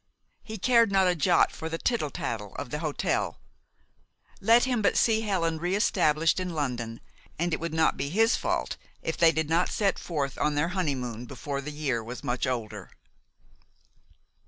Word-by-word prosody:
He 220 0 -7
cared 230 0 +4
not 195 -1 +4
a 180 - +3
jot 160 -5 +3
for 160 - -6
the 165 - -3
tittle 225 -6 0
tattle 105 -7 -5
of 120 - -6
the 150 - -2
hotel. 155 -3 -1 1.0
Let 230 +4 +5
him 250 -3 +1
but 205 - +2
see 220 -1 +3
Helen 170 -7 0
re 175 +3 0
established 165 -5 +2
in 180 -2 -4
London, 120 -6 -3 0.4
and 170 +1 -1
it - - 0
would 170 0 -3
not 160 0 +2
be 140 - -2
his 225 +7 +3
fault - - -2 0.3
if 165 - -2
they 165 -1 +5
did 160 -1 -1
not 165 +3 +2
set 200 -2 0
forth 140 -5 -3
on 150 -1 +1
their 150 +4 +1
honeymoon 130 - -2
before 140 +2 -5
the 150 +2 -6
year 140 -6 -2
was 120 +3 -8
much 125 +1 -1
older. 120 -4 -4
160 Hz, 180 wpm, -27 LUFS, 140-190 Hz, 1.0 s, Let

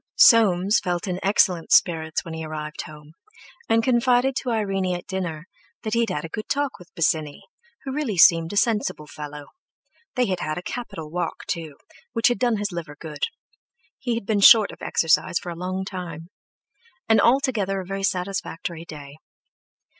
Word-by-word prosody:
Soames 200 -3 +6
felt 175 -1 -2
in 180 -1 -2
excellent 190 -4 +2
spirits 160 -2 +3
when 165 - -7
he 160 0 -5
arrived 155 -1 -5
home, 150 0 -13 0.6
and 225 0 +3
confided 250 +1 +2
to 255 - -2
Irene 195 -5 0
at 175 - -7
dinner 180 -4 -4 0.4
that 215 - -3
he 230 - +2
had 230 -2 +1
had 165 -4 -3
a - - -7
good 215 +5 -6
talk 285 -4 -1
with 180 0 -16
Bosinney, 155 -3 0 0.4
who 270 - -5
really 270 -9 -2
seemed 165 -1 +6
a 205 - -4
sensible 210 -8 0
fellow; 150 -1 -9 0.7
they 250 -1 +2
had 185 -4 -2
had 155 -2 -3
a 180 - -5
capital 165 -10 -6
walk 180 +1 -3
too, 160 -5 -4 0.4
which 230 +1 +3
had 245 - -1
done 240 -3 +2
his 205 0 -2
liver 170 -4 -6
good—he 265 - -7
had 230 - -4
been 210 0 +1
short 220 -1 +8
of - - -14
exercise 165 +1 +2
for 175 - -5
a - - -6
long 185 +2 -4
time—and 190 - -4
altogether 235 -7 +2
a 185 - -6
very 195 +1 -4
satisfactory 180 -3 -3
day. 145 -2 -10
185 Hz, 170 wpm, -24 LUFS, 165-225 Hz, 0.7 s, short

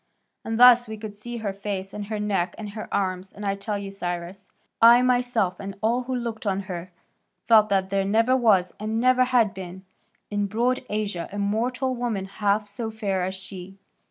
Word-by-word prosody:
And 225 0 -3
thus 245 -1 +8
we 220 0 -6
could 210 -1 -8
see 240 +3 -7
her 200 - -1
face, 195 -1 -5
and 205 -1 -6
her 215 0 -3
neck, 200 -4 -1
and 210 -2 -6
her 215 +1 -8
arms, 185 -1 -2
and 205 - -8
I 195 - +1
tell 200 +1 -3
you, 200 -1 -6
Cyrus," 180 0 -5
he - - -34 0.3
added, 230 +1 +9
"I - - +2
myself, 245 -7 +1
and 195 0 -7
all 230 +4 +1
who 260 0 -2
looked 230 -3 -4
on 195 0 0
her, 185 -2 -7 0.5
felt 215 -2 +6
that 190 -1 +1
there 195 0 +1
never 225 +6 +3
was, 210 -8 +3
and 215 +2 -2
never 255 +1 +4
had 245 -5 +2
been, 190 0 -9 0.5
in 205 -1 0
broad 240 +6 0
Asia 205 -5 -3
a 205 - -6
mortal 245 +6 0
woman 235 -6 -2
half 205 +1 0
so 215 +3 -5
fair 200 -4 -2
as 190 +1 -2
she. 190 0 -9
205 Hz, 205 wpm, -25 LUFS, 195-230 Hz, 0.5 s, added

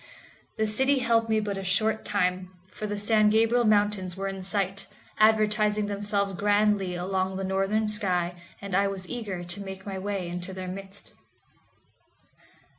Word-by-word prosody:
The 220 - +2
city 265 +6 +2
held 230 -3 +2
me 220 0 +3
but 205 -2 -3
a - - -5
short 215 +4 +1
time, 185 -2 0 0.2
for 215 - -5
the 205 0 -3
San 215 +1 +3
Gabriel 225 +2 +3
Mountains 205 -4 +2
were 195 0 -2
in 195 -1 -5
sight, 195 0 -1 0.3
advertising 215 -1 +3
themselves 200 -1 -1
grandly 205 -1 +2
along 190 +1 -1
the 195 - -3
northern 195 +3 0
sky, 185 -5 0 0.3
and 200 -2 -4
I 200 +1 +3
was 190 -2 -5
eager 200 -7 -4
to 175 +3 -4
make 190 -1 -8
my 195 -2 -4
way 195 -2 -3
into 180 +2 -4
their 185 0 -6
midst. 195 +2 -8
200 Hz, 160 wpm, -27 LUFS, 190-215 Hz, 0.3 s, me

